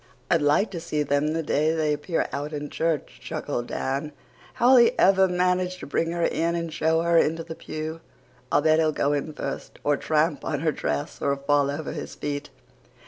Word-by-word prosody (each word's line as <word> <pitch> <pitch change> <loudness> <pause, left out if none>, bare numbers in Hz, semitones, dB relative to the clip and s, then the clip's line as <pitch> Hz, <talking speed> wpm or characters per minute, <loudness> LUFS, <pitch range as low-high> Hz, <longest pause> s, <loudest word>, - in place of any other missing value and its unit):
"I'd 170 -2 +4
like 145 +9 +3
to 175 - -4
see 155 -3 -1
them 145 +1 +1
the 165 0 -1
day 155 +2 +1
they 155 -2 +1
appear 150 +3 -1
out 145 +2 -4
in 145 0 -5
church," 165 -2 -2
chuckled 145 -6 -4
Dan. 140 +3 -3 0.4
"How'll 255 +2 +6
he 235 -1 +5
ever 190 0 +5
manage 180 0 +1
to - - -8
bring 165 +3 -1
her 170 0 -1
in 170 +1 0
and 170 -2 -3
show 160 +1 +2
her 170 0 +4
into 165 +1 +1
the 165 - -7
pew? 160 0 -6 0.5
I'll - - +3
bet 155 0 +4
he'll 155 -1 +3
go 145 -1 0
in 145 +2 -2
first 150 - -6
or 145 -1 +2
tramp 155 0 +1
on 145 -3 -2
her 160 -1 +2
dress 145 +1 -3
or 140 0 +1
fall 140 0 +2
over 145 +2 -4
his - - -6
feet." 145 0 -4
155 Hz, 200 wpm, -25 LUFS, 145-165 Hz, 0.5 s, How'll